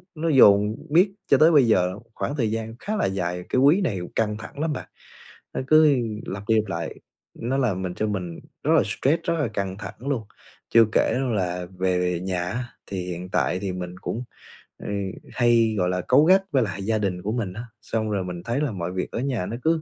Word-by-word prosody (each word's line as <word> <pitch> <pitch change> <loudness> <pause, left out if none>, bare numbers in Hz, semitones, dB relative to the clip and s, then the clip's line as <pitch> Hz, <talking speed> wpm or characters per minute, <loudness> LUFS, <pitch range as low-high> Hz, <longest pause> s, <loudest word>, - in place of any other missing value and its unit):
nó 165 +1 -1
dồn 105 -6 +6
miết 180 +6 +4 0.2
cho 140 - +5
tới 155 +4 +6
bây 140 -6 +5
giờ 90 -2 +2 0.2
khoảng 145 - -3
thời 115 -5 +1
gian 115 0 -4
khá 215 - -3
là - - +1
dài, 90 -2 -2
cái - - +2
quý 150 +8 +5
này 115 - -1 0.2
căng 105 -1 0
thẳng 110 +5 -10
lắm 155 0 0
bạn, - - -7 0.6
nó - - -2
cứ 155 -1 +6 0.3
lặp 100 +1 -5
đi 110 - +5
lặp 110 -1 +1
lại, 85 -3 -4 0.4
nó 125 +4 -2
làm 110 -9 0
mình 90 -1 -3
cho 110 - -1
mình 90 -5 -4 0.2
rất - - +1
là - - +6
stress, 160 +5 0
rất 170 - 0
là 145 - +1
căng 100 -3 -3
thẳng 100 -2 -7
luôn. 135 -6 -1 0.5
Chưa 115 -1 +6
kể - - +2 0.2
là 90 -3 -2
về 90 -1 +1
nhà 90 -1 -2
á, 110 +8 -3 0.2
thì 95 -2 -4
hiện 90 0 -6
tại 90 0 0
thì 95 -1 -3
mình 90 0 -6
cũng, 120 - -4 0.6
ừ, - - -6 0.5
hay, 115 -2 +3
gọi 90 -1 +1
là, 90 0 -1
cáu 150 - +6
gắt 190 +3 +5
với 135 -4 +3
lại 100 -1 -4
gia 110 +1 +1
đình 95 -4 -2
của 100 +4 -2
mình 110 -6 -2
á, 115 +4 -6 0.2
xong 110 -1 -2
rồi 100 -2 0
mình 90 -1 -6
thấy 115 +7 -1
là 150 -4 0
mọi 90 -3 -4
việc 95 - -3
ở - - -3
nhà 125 -7 -1
nó 115 - -4
cứ 160 0 +2
110 Hz, 225 wpm, -24 LUFS, 90-130 Hz, 0.6 s, dồn